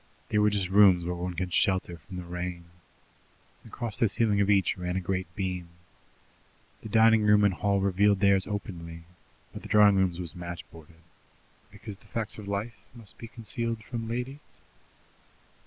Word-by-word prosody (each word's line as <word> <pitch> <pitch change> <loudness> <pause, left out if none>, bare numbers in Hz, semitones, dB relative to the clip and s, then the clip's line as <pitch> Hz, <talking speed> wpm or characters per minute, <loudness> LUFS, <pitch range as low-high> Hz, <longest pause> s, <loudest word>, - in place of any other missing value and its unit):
They 105 - +1
were 105 0 +4
just 100 -3 -1
rooms 95 -3 +5
where 90 - -2
one 90 0 -4
could 90 0 -3
shelter 95 -3 +1
from 90 +5 -11
the 90 - -5
rain. 90 0 -5 1.0
Across 115 -3 -5
the 115 - +3
ceiling 105 -1 +1
of 100 - +1
each 100 -4 +3
ran 90 -1 -4
a - - +1
great 95 0 -2
beam. 90 -3 -3 1.1
The 110 - -8
dining 110 0 +5
room 105 0 +4
and 100 -2 +3
hall 100 +2 0
revealed 100 +1 +3
theirs 100 -1 +3
openly, 85 -5 -6 0.5
but - - -8
the - - -9
drawing 105 -2 +6
room's 95 -3 +1
was 85 -4 -5
match 85 -1 -7
boarded 80 +1 -16 0.7
because 105 -2 -10
the - - -23
facts 110 -1 -4
of 105 - -9
life 105 +3 -3 0.2
must 115 -4 -13
be 115 - -8
concealed 115 0 -4
from 115 0 -5
ladies? 125 +5 -6
100 Hz, 170 wpm, -28 LUFS, 90-105 Hz, 1.1 s, drawing